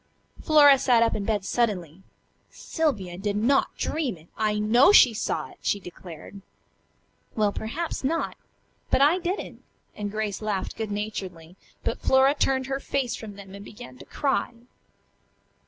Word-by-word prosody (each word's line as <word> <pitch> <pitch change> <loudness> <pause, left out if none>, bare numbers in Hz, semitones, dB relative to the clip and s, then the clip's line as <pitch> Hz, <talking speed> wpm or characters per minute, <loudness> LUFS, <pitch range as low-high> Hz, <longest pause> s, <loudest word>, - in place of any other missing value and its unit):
Flora 290 -3 +6
sat 240 -3 +4
up 230 - +1
in 205 - -3
bed 210 -3 -1
suddenly. 190 -9 -1 0.5
"Sylvia 200 - -3
did 200 0 -2
not 240 +7 +1
dream 285 - -2
it. 160 +2 -20
I 215 -1 0
know 235 - +5
she 255 - +7
saw 215 - -3
it," - - -19
she 200 - 0
declared. 180 +1 -11 0.9
"Well, 210 -2 +2
perhaps 285 +12 -4
so. 325 +5 -1 0.6
But - - +2
I 310 +6 +5
didn't," 365 +3 -4 0.3
and 205 -1 -4
Grace 215 -1 -3
laughed 210 -3 -3
good 220 -2 -4
naturedly; 190 -5 -6 0.3
but - - -3
Flora 265 +1 +4
turned 265 -2 0
her 270 +1 -3
face 270 -3 -2
from 210 -3 -9
them 195 -1 -12
and 200 0 -9
began 245 +4 -12
to - - -12
cry. 270 -4 -1
220 Hz, 155 wpm, -25 LUFS, 200-270 Hz, 0.9 s, she